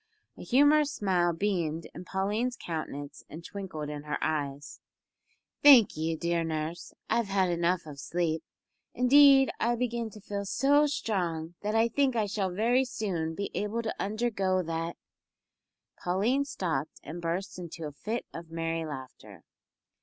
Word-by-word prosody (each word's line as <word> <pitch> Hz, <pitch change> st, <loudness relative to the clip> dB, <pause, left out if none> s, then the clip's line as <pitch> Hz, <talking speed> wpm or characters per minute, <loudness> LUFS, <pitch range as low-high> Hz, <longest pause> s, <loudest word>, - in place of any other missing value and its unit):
A -, -, -11 dB
humorous 290 Hz, +3 st, +4 dB
smile 180 Hz, -4 st, +2 dB
beamed 165 Hz, -3 st, -1 dB
in 180 Hz, -, -9 dB
Pauline's 210 Hz, +7 st, -1 dB
countenance 150 Hz, -5 st, -6 dB
and 165 Hz, +2 st, -9 dB
twinkled 185 Hz, -7 st, -6 dB
in 150 Hz, 0 st, -5 dB
her 150 Hz, 0 st, -3 dB
eyes. 145 Hz, -2 st, -3 dB, 0.8 s
"Thank 270 Hz, -7 st, +8 dB
you, 160 Hz, +1 st, -1 dB
dear 170 Hz, 0 st, 0 dB
nurse, 160 Hz, +1 st, -4 dB, 0.2 s
I've 230 Hz, -1 st, +1 dB
had 190 Hz, -2 st, +2 dB
enough 170 Hz, +1 st, +1 dB
of 145 Hz, -2 st, -9 dB
sleep. 165 Hz, +1 st, -1 dB, 0.5 s
Indeed, 270 Hz, +1 st, +7 dB
I 240 Hz, +1 st, +2 dB
begin 235 Hz, -1 st, -2 dB
to 215 Hz, -, -12 dB
feel 200 Hz, 0 st, -4 dB
so 285 Hz, +8 st, +3 dB
strong 175 Hz, -, -2 dB
that 210 Hz, +1 st, -1 dB
I 225 Hz, +1 st, +4 dB
think 270 Hz, +1 st, +1 dB
I 220 Hz, -2 st, +2 dB
shall 200 Hz, -2 st, -1 dB
very 230 Hz, +8 st, +2 dB
soon 185 Hz, -10 st, -3 dB
be 200 Hz, -, -4 dB
able 215 Hz, +3 st, -2 dB
to 220 Hz, -, -2 dB
undergo 200 Hz, -3 st, 0 dB
that 165 Hz, 0 st, -3 dB, 0.5 s
" -, -, -31 dB
Pauline 220 Hz, +10 st, +1 dB
stopped 165 Hz, -, -3 dB
and 165 Hz, +4 st, -7 dB
burst 175 Hz, +3 st, -3 dB
into 170 Hz, -2 st, -7 dB
a 150 Hz, -, -5 dB
fit 215 Hz, +11 st, -4 dB
of 165 Hz, 0 st, -8 dB
merry 165 Hz, 0 st, -2 dB
laughter. 135 Hz, -4 st, -9 dB
185 Hz, 155 wpm, -29 LUFS, 165-230 Hz, 0.8 s, Thank